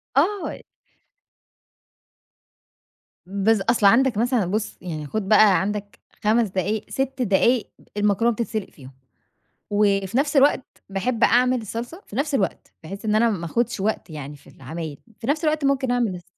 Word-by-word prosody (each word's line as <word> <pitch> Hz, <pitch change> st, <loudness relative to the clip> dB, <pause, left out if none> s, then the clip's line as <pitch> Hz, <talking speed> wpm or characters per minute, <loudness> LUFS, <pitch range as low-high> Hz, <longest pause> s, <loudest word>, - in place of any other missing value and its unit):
آه 375 Hz, +7 st, +1 dB, 2.7 s
بس 200 Hz, +2 st, +1 dB
أصل 225 Hz, 0 st, +1 dB
عندك 235 Hz, +2 st, +5 dB
مثلًا 240 Hz, -3 st, +1 dB
بُصّ، 210 Hz, +4 st, -3 dB
يعني 155 Hz, -4 st, -5 dB
خد 205 Hz, +4 st, -3 dB
بقى 210 Hz, -3 st, +6 dB
عندك 205 Hz, -1 st, -4 dB, 0.2 s
5 220 Hz, +1 st, +3 dB
دقايق 195 Hz, +3 st, -2 dB
6 270 Hz, -1 st, -2 dB
دقايق 230 Hz, +2 st, +2 dB, 0.3 s
المكرونة 210 Hz, +3 st, +2 dB
بتتسِلق 220 Hz, -3 st, -3 dB
فيهم، 130 Hz, -3 st, -14 dB, 0.8 s
وفي 205 Hz, +1 st, +1 dB
نفس 285 Hz, +1 st, +1 dB
الوقت 275 Hz, -1 st, +4 dB, 0.3 s
باحب 225 Hz, +4 st, -1 dB
أعمل 250 Hz, 0 st, +4 dB
الصلصة 235 Hz, -, -6 dB
في 205 Hz, -, -11 dB
نفس 280 Hz, +1 st, 0 dB
الوقت، 200 Hz, -, -2 dB
بحيث 195 Hz, +7 st, -8 dB
إن 215 Hz, 0 st, +1 dB
أنا 230 Hz, +1 st, +4 dB
ما 175 Hz, -5 st, -3 dB
اخدش 235 Hz, +4 st, -1 dB
وقت 205 Hz, -2 st, -2 dB
يعني 150 Hz, -2 st, -7 dB
في -, -, -22 dB
العمايل 150 Hz, +2 st, -7 dB, 0.2 s
في 225 Hz, -, -7 dB
نفس 305 Hz, +3 st, 0 dB
الوقت 305 Hz, -2 st, +1 dB
ممكن 270 Hz, -2 st, +1 dB
أعمل 235 Hz, -6 st, 0 dB
الص 175 Hz, -, -11 dB
215 Hz, 150 wpm, -23 LUFS, 195-245 Hz, 2.7 s, بقى